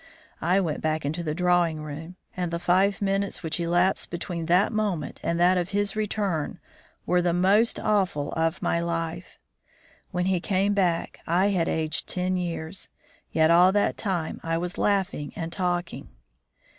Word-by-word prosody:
I 180 Hz, +4 st, +3 dB
went 160 Hz, -6 st, -2 dB
back 155 Hz, -1 st, -1 dB
into 160 Hz, +5 st, -2 dB
the 155 Hz, -2 st, -3 dB
drawing 175 Hz, -3 st, +2 dB
room, 155 Hz, +4 st, -7 dB, 0.2 s
and 180 Hz, -2 st, -2 dB
the 170 Hz, -, -2 dB
five 190 Hz, +4 st, +2 dB
minutes 195 Hz, 0 st, -1 dB
which 160 Hz, +1 st, -2 dB
elapsed 175 Hz, +2 st, +1 dB
between 170 Hz, -1 st, -4 dB
that 180 Hz, +6 st, +4 dB
moment 200 Hz, -9 st, -2 dB
and 170 Hz, 0 st, -1 dB
that 180 Hz, +1 st, +4 dB
of 175 Hz, +1 st, -2 dB
his 205 Hz, +1 st, -1 dB
return 205 Hz, -7 st, -1 dB, 0.5 s
were 180 Hz, 0 st, +2 dB
the 175 Hz, -1 st, +1 dB
most 200 Hz, +6 st, +3 dB
awful 190 Hz, -9 st, 0 dB
of 165 Hz, +1 st, -1 dB
my 170 Hz, -, +1 dB
life. 165 Hz, -1 st, -4 dB, 0.7 s
When 180 Hz, 0 st, -1 dB
he 190 Hz, -1 st, +2 dB
came 195 Hz, +3 st, +1 dB
back 180 Hz, -4 st, 0 dB
I 180 Hz, +4 st, +3 dB
had 180 Hz, -4 st, +1 dB
aged 155 Hz, -1 st, -1 dB
ten 185 Hz, 0 st, 0 dB
years, 175 Hz, 0 st, -4 dB, 0.4 s
yet 160 Hz, 0 st, +4 dB
all 175 Hz, +2 st, +6 dB
that 205 Hz, -, +2 dB
time 180 Hz, -6 st, -2 dB
I 165 Hz, 0 st, -1 dB
was 175 Hz, +3 st, -4 dB
laughing 195 Hz, -7 st, 0 dB
and 165 Hz, 0 st, -5 dB
talking. 175 Hz, -2 st, -2 dB
175 Hz, 165 wpm, -26 LUFS, 165-190 Hz, 0.7 s, all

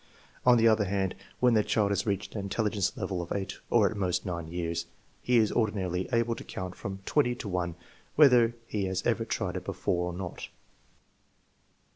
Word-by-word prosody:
On 125 Hz, -1 st, +8 dB
the 115 Hz, 0 st, +5 dB
other 110 Hz, -2 st, +4 dB
hand, 95 Hz, -1 st, 0 dB, 0.3 s
when 125 Hz, -1 st, +4 dB
the 110 Hz, -2 st, +4 dB
child 100 Hz, -1 st, +1 dB
has 100 Hz, +3 st, 0 dB
reached 100 Hz, 0 st, -2 dB
an 105 Hz, -, -3 dB
intelligence 100 Hz, 0 st, -1 dB
level 90 Hz, -3 st, -2 dB
of 85 Hz, -, -8 dB
8 95 Hz, -1 st, -3 dB
or 110 Hz, -4 st, +5 dB
at 110 Hz, -, -3 dB
most 90 Hz, -2 st, -1 dB
9 85 Hz, -3 st, -4 dB
years, 85 Hz, 0 st, -3 dB, 0.3 s
he 125 Hz, -1 st, +3 dB
is 110 Hz, -2 st, +4 dB
ordinarily 95 Hz, -5 st, 0 dB
able 115 Hz, -1 st, +2 dB
to -, -, -8 dB
count 90 Hz, -1 st, -6 dB
from 95 Hz, 0 st, -6 dB
20 125 Hz, -5 st, +2 dB
to 120 Hz, -3 st, -7 dB
1 90 Hz, -3 st, -2 dB, 0.4 s
whether 125 Hz, -6 st, +6 dB
he 105 Hz, -3 st, -2 dB
has 95 Hz, 0 st, -2 dB
ever 115 Hz, -1 st, +2 dB
tried 95 Hz, -4 st, -2 dB
it 90 Hz, -, -6 dB
before 90 Hz, -2 st, -1 dB
or -, -, -8 dB
not. 90 Hz, -2 st, -6 dB
100 Hz, 190 wpm, -29 LUFS, 90-115 Hz, 0.4 s, On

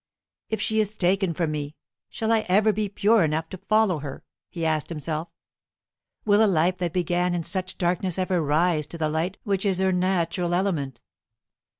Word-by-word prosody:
"If 220 Hz, -, -2 dB
she 220 Hz, 0 st, 0 dB
is 215 Hz, 0 st, 0 dB
taken 190 Hz, -1 st, +2 dB
from 165 Hz, -2 st, -1 dB
me, 150 Hz, 0 st, -4 dB, 0.3 s
shall 225 Hz, -1 st, -2 dB
I 225 Hz, -, +4 dB
ever 210 Hz, +3 st, +4 dB
be 210 Hz, 0 st, -1 dB
pure 210 Hz, +1 st, +3 dB
enough 160 Hz, +1 st, -1 dB
to 185 Hz, -, -8 dB
follow 205 Hz, -3 st, +2 dB
her?" 140 Hz, -2 st, -7 dB, 0.3 s
he 165 Hz, -2 st, -4 dB
asked 155 Hz, -2 st, 0 dB
himself. 155 Hz, 0 st, -4 dB, 1.0 s
"Will 210 Hz, +1 st, +5 dB
a -, -, +5 dB
life 180 Hz, +1 st, +2 dB
that 175 Hz, -2 st, -1 dB
began 175 Hz, +1 st, 0 dB
in 170 Hz, -, -2 dB
such 185 Hz, +2 st, -2 dB
darkness 180 Hz, 0 st, 0 dB
ever 185 Hz, -2 st, 0 dB
rise 155 Hz, +1 st, +1 dB
to 170 Hz, -, -8 dB
the 155 Hz, -2 st, 0 dB
light 165 Hz, +5 st, -2 dB
which 195 Hz, -2 st, -1 dB
is 195 Hz, -3 st, +1 dB
her 190 Hz, 0 st, +2 dB
natural 180 Hz, -1 st, 0 dB
element? 155 Hz, -10 st, -1 dB
180 Hz, 185 wpm, -25 LUFS, 160-195 Hz, 1.0 s, Will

